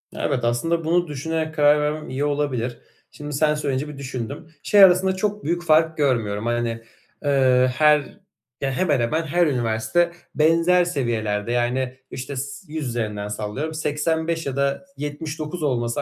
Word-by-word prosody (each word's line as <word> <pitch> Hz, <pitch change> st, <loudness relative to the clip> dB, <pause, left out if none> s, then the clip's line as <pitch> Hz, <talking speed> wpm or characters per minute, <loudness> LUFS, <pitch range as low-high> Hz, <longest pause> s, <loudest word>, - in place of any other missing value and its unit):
Evet, 125 Hz, -, -1 dB
aslında 165 Hz, +8 st, 0 dB
bunu 175 Hz, +2 st, +2 dB
düşünerek 160 Hz, +2 st, -3 dB
karar 150 Hz, 0 st, +5 dB
vermem 150 Hz, +1 st, -2 dB
iyi 135 Hz, +3 st, -1 dB
olabilir. 140 Hz, -5 st, -1 dB, 0.3 s
Şimdi 150 Hz, 0 st, -7 dB
sen 150 Hz, +2 st, +2 dB
söyleyince 145 Hz, -1 st, -2 dB
bir 150 Hz, -, -9 dB
düşündüm. 135 Hz, +3 st, -6 dB, 0.2 s
Şey 205 Hz, -1 st, +6 dB
arasında 190 Hz, 0 st, +5 dB
çok 210 Hz, +2 st, -2 dB
büyük 175 Hz, +2 st, -1 dB
fark 160 Hz, 0 st, +3 dB
görmüyorum. 115 Hz, -7 st, 0 dB
Hani, 120 Hz, -1 st, -1 dB, 0.4 s
ııı, 130 Hz, -2 st, +4 dB
her 150 Hz, +3 st, +4 dB, 0.6 s
ya, 135 Hz, -, 0 dB
hemen 145 Hz, -1 st, +1 dB
hemen 155 Hz, +8 st, 0 dB
her 170 Hz, +2 st, +2 dB
üniversite 125 Hz, +7 st, +1 dB, 0.2 s
benzer 165 Hz, +4 st, +4 dB
seviyelerde, 115 Hz, -9 st, -1 dB
yani 125 Hz, +1 st, 0 dB
işte 135 Hz, +2 st, -6 dB
s 140 Hz, +7 st, -6 dB
yüz 155 Hz, -5 st, -3 dB
üzerinden 105 Hz, -4 st, -3 dB
sallıyorum, 110 Hz, +10 st, -4 dB
85 160 Hz, +2 st, -1 dB
ya 140 Hz, -1 st, -3 dB
da 140 Hz, +5 st, -1 dB
79 150 Hz, +3 st, -5 dB
olması 120 Hz, -1 st, 0 dB
145 Hz, 150 wpm, -23 LUFS, 125-160 Hz, 0.6 s, Şey